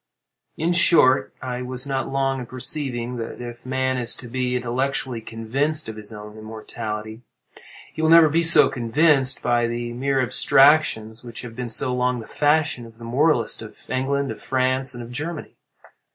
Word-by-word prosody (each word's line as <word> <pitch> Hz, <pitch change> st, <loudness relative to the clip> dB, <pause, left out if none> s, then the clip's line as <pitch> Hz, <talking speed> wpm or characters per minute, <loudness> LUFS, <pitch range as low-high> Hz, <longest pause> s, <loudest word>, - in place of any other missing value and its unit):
In 165 Hz, +3 st, 0 dB
short, 165 Hz, -6 st, +4 dB
I 125 Hz, -1 st, -4 dB
was 125 Hz, +1 st, -2 dB
not 135 Hz, -1 st, -2 dB
long 135 Hz, 0 st, 0 dB
in 125 Hz, -, -7 dB
perceiving 125 Hz, -2 st, -2 dB
that 115 Hz, -1 st, -6 dB
if 120 Hz, 0 st, -9 dB
man 130 Hz, 0 st, -1 dB
is 120 Hz, -1 st, +1 dB
to 125 Hz, -, -8 dB
be 125 Hz, +1 st, -2 dB
intellectually 125 Hz, 0 st, -2 dB
convinced 135 Hz, +8 st, -2 dB
of 110 Hz, -, -6 dB
his 110 Hz, 0 st, -11 dB
own 105 Hz, 0 st, -10 dB
immortality, 110 Hz, 0 st, -7 dB, 0.7 s
he 160 Hz, -, -5 dB
will 160 Hz, -, +2 dB
never 165 Hz, -1 st, +8 dB
be 160 Hz, +3 st, +1 dB
so 165 Hz, 0 st, +7 dB
convinced 135 Hz, +2 st, +2 dB
by 120 Hz, -1 st, +1 dB
the 120 Hz, 0 st, -4 dB
mere 135 Hz, +2 st, -1 dB
abstractions 125 Hz, -3 st, +3 dB
which 120 Hz, 0 st, -9 dB
have 115 Hz, -2 st, -9 dB
been 125 Hz, -1 st, -5 dB
so 125 Hz, +3 st, +1 dB
long 125 Hz, 0 st, 0 dB
the 115 Hz, -, -8 dB
fashion 145 Hz, -4 st, 0 dB
of 115 Hz, 0 st, -17 dB
the 115 Hz, -, -13 dB
moralists 125 Hz, -1 st, +1 dB
of 110 Hz, -, -11 dB
England, 135 Hz, +2 st, -1 dB
of -, -, -9 dB
France, 130 Hz, 0 st, 0 dB
and 120 Hz, -, -7 dB
of 120 Hz, -, -11 dB
Germany. 155 Hz, +5 st, -6 dB
125 Hz, 175 wpm, -22 LUFS, 120-140 Hz, 0.7 s, never